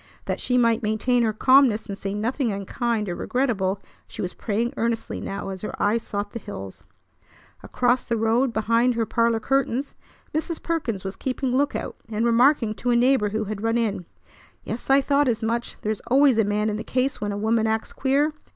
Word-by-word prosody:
That - - -3
she 250 - +1
might 230 -1 +3
maintain 225 +3 +1
her 225 -2 +2
calmness 255 0 +4
and 200 - -5
say 195 0 -4
nothing 235 +3 -1
unkind 210 +2 -2
or 175 - -2
regrettable 205 -4 -1 0.3
she - - -6
was 180 - -4
praying 230 +2 -2
earnestly 230 0 -2
now 195 0 -5
as 190 -1 -6
her 215 - -6
eyes 220 +3 +2
sought 205 -1 -4
the 230 - -5
hills. 95 - -8 0.8
Across 245 0 +1
the 235 - 0
road 230 +4 +2
behind 230 +2 +2
her 230 -1 0
parlor 230 0 +1
curtains 270 +2 0 0.4
Mrs. 320 +2 -2
Perkins 255 - -2
was 190 0 -5
keeping 260 +3 -2
lookout, 285 +2 -1
and 220 +1 -1
remarking 235 -1 +4
to 245 +3 -3
a 240 - +4
neighbor 245 -3 +3
who 215 +1 -2
had 210 -1 -5
run 225 +1 +1
in: 200 -6 -1 0.6
"Yes, 235 - -6
I 270 +1 +6
thought 280 +1 +2
as 230 -2 0
much. 235 +1 -2
There's 215 -1 -2
always 265 -2 +4
a - - +5
man 210 +1 0
in 210 - -3
the 220 - -5
case 255 +1 -1
when 205 -1 -1
a 200 - -3
woman 220 +1 +1
acts 220 0 -2
queer! 280 +3 +1
230 Hz, 195 wpm, -24 LUFS, 210-255 Hz, 0.8 s, I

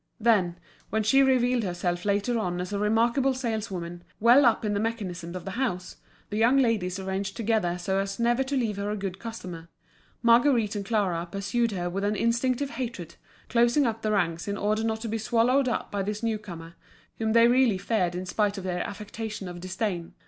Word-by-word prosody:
Then, 205 -7 +2 0.3
when 220 +1 0
she 270 +6 +5
revealed 255 -2 +3
herself 175 -2 -2
later 205 +4 +1
on 180 -4 -2
as 180 +3 -4
a 200 - -1
remarkable 235 +5 +2
saleswoman, 200 -8 -4 0.2
well 240 +4 +6
up 225 -1 +2
in 210 - 0
the 200 - 0
mechanism 185 -6 -3
of 185 - -6
the 195 - -4
house, 185 -7 -3 0.3
the 210 - -2
young 235 +5 +4
ladies 215 -8 +1
arranged 190 0 -3
together 215 -6 0
so 190 +2 -1
as 195 +1 -3
never 240 +2 +2
to 275 +1 -1
leave 220 -5 -1
her 200 +1 -2
a 210 - -2
good 195 -1 -4
customer. 180 -8 -7 0.5
Marguerite 235 -2 +4
and 205 - -2
Clara 185 -6 0
pursued 200 +4 0
her 175 -2 -2
with 190 +3 -3
an 205 +1 +1
instinctive 250 +5 0
hatred, 230 - -5 0.3
closing 240 +4 +3
up 225 -1 -1
the 215 - 0
ranks 170 -4 0
in 200 0 -2
order 215 +2 0
not 220 -1 -1
to 230 - -4
be 225 +1 -2
swallowed 240 +5 +2
up 230 - -3
by 200 -1 -1
this 210 +3 -3
new 225 -2 0
comer, 170 -5 -9 0.5
whom 220 -1 0
they 230 0 +7
really 245 -4 +4
feared 185 -3 0
in 180 +1 -4
spite 205 +2 0
of 190 - -5
their 180 -1 -2
affectation 210 0 -6
of 175 -1 -7
disdain. 185 -1 -3
210 Hz, 200 wpm, -27 LUFS, 185-235 Hz, 0.5 s, they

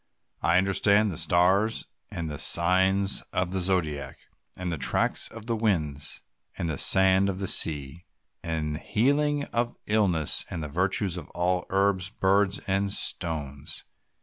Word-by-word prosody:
I 85 +1 +2
understand 100 +2 +3
the - - -6
stars, 90 +6 +2 0.3
and 85 -1 -4
the 75 -2 -6
signs 95 +3 +3
of 90 -1 -1
the 95 0 -1
Zodiac, 80 -7 -2 0.4
and 90 -1 -4
the 80 - -4
tracks - - +1
of 110 -1 -10
the 115 -1 -2
winds, 80 -10 -2 0.4
the 80 -4 -3
sand 95 +1 +4
of 95 - -4
the 95 - -4
sea, 75 +1 +1 0.3
the 80 -1 -4
healing 145 +5 +1
of 120 0 -1
illness, 95 -8 +1
and 85 -3 -5
the 75 - -6
virtues 95 +3 0
of 80 - -9
all 90 +1 -1
herbs, 95 -1 0
birds, 100 0 +1
and 100 +1 0
stones. 75 -7 -2
95 Hz, 145 wpm, -26 LUFS, 80-100 Hz, 0.4 s, sand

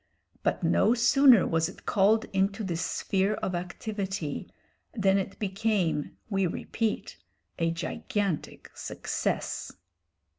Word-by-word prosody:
But - - 0
no 230 - +4
sooner 250 -2 +6
was 165 0 +1
it 185 - -14
called 210 +3 +3
into 195 +3 +1
this 170 -3 -2
sphere 195 +3 0
of 185 - -3
activity, 190 -2 -4 0.5
than 195 -3 +3
it 195 0 -5
became, 195 -6 -1
we 195 -3 +1
repeat, 220 +5 -3 0.4
a 165 0 +2
gigantic 185 - -3
success. - - -3
195 Hz, 110 wpm, -28 LUFS, 180-215 Hz, 0.5 s, sooner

